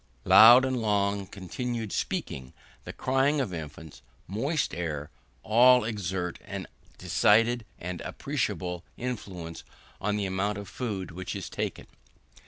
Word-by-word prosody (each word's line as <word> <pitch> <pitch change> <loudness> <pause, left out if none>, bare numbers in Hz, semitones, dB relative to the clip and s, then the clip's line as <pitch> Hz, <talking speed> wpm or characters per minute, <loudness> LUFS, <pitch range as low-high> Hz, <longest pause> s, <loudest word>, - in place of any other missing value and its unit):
Loud 120 +4 +9
and 130 -2 -1
long 100 -2 0
continued 110 +4 -4
speaking, 65 -1 -3 0.3
the - - -5
crying 135 +3 +1
of 125 -9 -2
infants, 80 -1 -8 0.2
moist 140 - -1
air, 75 -4 -4 0.3
all 125 +3 +6
exert 95 -5 -3
a - - -5 0.3
decided 115 +2 +3
and 90 0 -5
appreciable 90 -1 -3
influence 95 -9 -6 0.4
on 105 +1 0
the 100 - -1
amount 95 +2 -1
of 100 -1 -7
food 100 -8 -4
which 95 +2 -6
is - - -6
taken. - - -4
100 Hz, 125 wpm, -28 LUFS, 90-120 Hz, 0.4 s, Loud